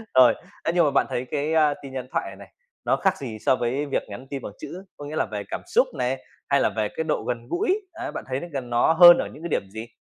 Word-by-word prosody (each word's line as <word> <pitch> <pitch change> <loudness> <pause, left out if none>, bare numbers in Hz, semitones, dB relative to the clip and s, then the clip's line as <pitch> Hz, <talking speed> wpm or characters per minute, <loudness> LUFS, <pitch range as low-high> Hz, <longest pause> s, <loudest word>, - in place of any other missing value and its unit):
Rồi, 130 -2 +8 0.3
ấy, 165 - 0
nhưng 175 -1 +4
mà 145 - +2
bạn 140 - +3
thấy 125 +1 -2
cái, 150 +2 -1
a, 155 -2 +4
tin 135 -1 -9
nhắn 130 -1 -5
thoại - - -1
này - - -10
này, - - -13 0.4
nó - - +3
khác 190 -1 +1
gì 115 -6 -6
so 130 - +5
với 130 +5 -1
việc 140 - -1
nhắn 120 +6 -9
tin 140 -2 -4
bằng 100 - -7
chữ, 185 +2 -8
có 145 - -8
nghĩa 150 - -6
là - - +1
về 105 -1 -5
cảm - - -4
xúc - - +3
này, 125 +2 0 0.3
hay 140 - +4
là - - +3
về 105 -1 -2
cái 160 - -1
độ - - -1
gần 120 -1 -3
gũi, 375 - +1
á, 340 0 -5
bạn - - -6
thấy 130 0 -2
nó 175 - -7
gần 130 -4 -5
nó 120 +6 +3
hơn 175 +1 +10
ở - - -1
những 155 - -12
cái 170 - -4
điểm 100 -8 -1
gì? 110 +2 -7
135 Hz, 295 wpm, -24 LUFS, 120-160 Hz, 0.4 s, hơn